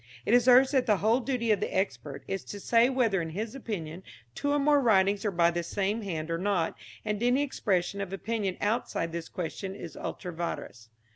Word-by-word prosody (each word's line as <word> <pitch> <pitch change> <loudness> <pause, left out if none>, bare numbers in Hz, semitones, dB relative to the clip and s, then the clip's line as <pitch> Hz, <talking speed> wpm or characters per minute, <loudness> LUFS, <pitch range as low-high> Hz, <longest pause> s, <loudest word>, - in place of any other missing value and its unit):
It - - +2
is 245 0 +5
urged 255 +1 +7
that 260 -3 +2
the 210 -2 +4
whole 220 +6 +3
duty 245 -3 -1
of 205 - +3
the - - -2
expert 155 -7 -3
is 195 - -3
to 205 - -7
say 230 +4 +4
whether 230 -8 +1
in 165 - -4
his 215 +8 -4
opinion 185 - -5 0.3
two 285 - -1
or 290 - +3
more 290 0 +4
writings 200 -4 +3
are - - +3
by 170 -2 +3
the 175 0 -2
same 200 +5 -1
hand 165 -5 -4
or 165 - -1
not, 185 -3 0 0.3
and 210 0 -2
any 245 +4 +3
expression 200 -7 -1
of 195 -2 -5
opinion 195 -1 -2
outside 205 -6 -1
this 170 -1 -5
question 190 +2 -5
is 170 -5 -8
ultra 180 -3 -6
vires. 145 -9 -5
200 Hz, 210 wpm, -29 LUFS, 175-235 Hz, 0.3 s, urged